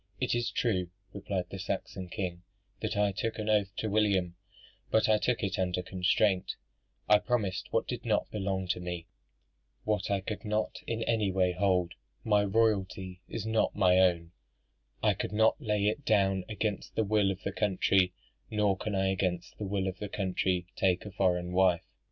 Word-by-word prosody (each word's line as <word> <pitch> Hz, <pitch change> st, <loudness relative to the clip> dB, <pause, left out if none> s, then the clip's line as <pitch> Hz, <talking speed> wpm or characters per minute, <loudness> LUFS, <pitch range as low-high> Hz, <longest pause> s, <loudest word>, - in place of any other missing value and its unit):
"It -, -, 0 dB
is 120 Hz, 0 st, 0 dB
true," 95 Hz, -7 st, 0 dB, 0.2 s
replied 95 Hz, -2 st, -3 dB
the 95 Hz, -, -6 dB
Saxon 95 Hz, -1 st, -4 dB
king, 90 Hz, -1 st, -4 dB, 0.4 s
"that -, -, -2 dB
I 105 Hz, -1 st, +3 dB
took 110 Hz, +3 st, -3 dB
an 110 Hz, -1 st, -3 dB
oath 105 Hz, -2 st, +3 dB
to 110 Hz, -, -2 dB
William; 100 Hz, -4 st, +1 dB, 0.5 s
but 110 Hz, -1 st, +3 dB
I 110 Hz, -1 st, +4 dB
took 125 Hz, 0 st, 0 dB
it 100 Hz, -1 st, -1 dB
under 90 Hz, -1 st, 0 dB
constraint: 95 Hz, +1 st, +1 dB, 0.5 s
I 105 Hz, 0 st, +6 dB
promised 110 Hz, -7 st, -1 dB
what -, -, +1 dB
did -, -, -4 dB
not -, -, 0 dB
belong 95 Hz, -2 st, -2 dB
to 90 Hz, -, 0 dB
me 90 Hz, -2 st, -5 dB, 0.8 s
what 105 Hz, -1 st, 0 dB
I 100 Hz, -1 st, +2 dB
could 105 Hz, +1 st, -5 dB
not 105 Hz, 0 st, -1 dB
in 115 Hz, 0 st, -1 dB
any 110 Hz, -4 st, +1 dB
way 90 Hz, -1 st, +2 dB
hold: 90 Hz, -1 st, +1 dB, 0.3 s
my 105 Hz, -2 st, +3 dB
royalty 95 Hz, -3 st, 0 dB
is 110 Hz, -, -4 dB
not 110 Hz, 0 st, +1 dB
my 95 Hz, -2 st, +4 dB
own; 85 Hz, -3 st, +3 dB, 0.7 s
I -, -, +4 dB
could -, -, -4 dB
not 110 Hz, +6 st, +3 dB
lay 105 Hz, -4 st, 0 dB
it 110 Hz, +7 st, 0 dB
down 95 Hz, -4 st, +2 dB
against 105 Hz, -1 st, -3 dB
the 110 Hz, -, +2 dB
will 105 Hz, -1 st, +2 dB
of 95 Hz, -1 st, -4 dB
the 100 Hz, -, -2 dB
country, 95 Hz, -2 st, +2 dB, 0.4 s
nor 105 Hz, -2 st, +2 dB
can 105 Hz, +2 st, -3 dB
I 95 Hz, 0 st, +2 dB
against 90 Hz, -2 st, -2 dB
the 105 Hz, -, -3 dB
will 95 Hz, -1 st, -1 dB
of 95 Hz, 0 st, -4 dB
the 105 Hz, -, -4 dB
country 95 Hz, -2 st, 0 dB
take 90 Hz, 0 st, +1 dB
a 105 Hz, -, -7 dB
foreign 90 Hz, -3 st, +1 dB
wife. 90 Hz, -2 st, +3 dB
95 Hz, 180 wpm, -30 LUFS, 90-105 Hz, 0.8 s, I